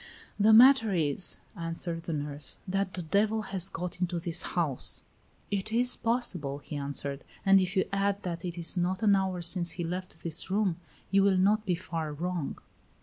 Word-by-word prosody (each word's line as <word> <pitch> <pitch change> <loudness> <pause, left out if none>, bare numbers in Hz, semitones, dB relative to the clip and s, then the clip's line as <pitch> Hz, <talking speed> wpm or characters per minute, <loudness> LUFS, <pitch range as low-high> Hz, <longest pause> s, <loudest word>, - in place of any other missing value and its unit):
"The 210 +2 +5
matter 235 -1 +7
is," 160 0 +2 0.2
answered 165 -1 -5
the 165 - -3
nurse, 145 0 -5
"that 195 0 -2
the 180 - -4
devil 215 +6 +1
has 190 -2 -2
got 180 +1 -6
into 175 -1 -1
this 165 -1 +3
house." 155 -7 -2 0.5
"It 200 +1 -1
is 245 +2 +4
possible," 185 - 0
he 150 +1 -9
answered; 140 0 -4 0.2
"and 195 0 +6
if 185 +2 -2
you 190 - +3
add 200 0 0
that 175 0 -4
it 175 -1 -5
is 170 +1 +1
not 180 +3 -1
an 205 -2 +5
hour 190 -2 -1
since 170 0 +3
he 175 - -4
left 180 -1 -6
this 165 +1 -2
room, 195 -3 0 0.3
you 195 0 +4
will 195 -1 +3
not 210 +3 +2
be 180 - +2
far 165 -3 -5
wrong." 175 0 -4
180 Hz, 185 wpm, -29 LUFS, 165-195 Hz, 0.5 s, matter